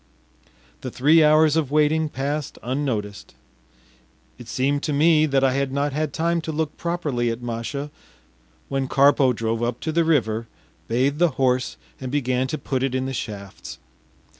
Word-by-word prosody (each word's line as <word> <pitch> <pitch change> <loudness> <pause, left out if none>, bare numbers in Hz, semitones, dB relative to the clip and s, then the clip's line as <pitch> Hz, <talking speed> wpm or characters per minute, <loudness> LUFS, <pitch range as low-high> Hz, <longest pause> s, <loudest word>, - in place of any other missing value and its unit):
The - - -4
three 155 +5 +4
hours 155 0 +5
of 160 -5 0
waiting 155 +1 +2
passed 145 +1 -3
unnoticed. 115 -6 -3 1.0
It 120 - -11
seemed 140 +3 0
to 150 - -2
me 155 +1 +4
that 135 -2 +1
I 135 - +4
had 135 0 -1
not 140 +1 -1
had 155 0 -1
time 170 +3 0
to 160 - -4
look 155 0 -2
properly 150 -9 -2
at 115 +1 -4
Masha 120 +5 -4 0.8
when 135 -1 -2
Karpo 140 -1 +4
drove 115 -1 -2
up 120 0 -1
to 160 - -2
the 170 +1 +2
river, 115 -8 +1 0.4
bathed 135 +6 0
the 175 -1 +4
horse, 130 -1 +1 0.2
and 130 -1 -5
began 130 -2 0
to 155 +3 -3
put 130 -4 -3
it 135 -1 -1
in 130 0 -1
the 135 - -4
shafts. 100 -5 -7
140 Hz, 165 wpm, -23 LUFS, 125-155 Hz, 1.0 s, hours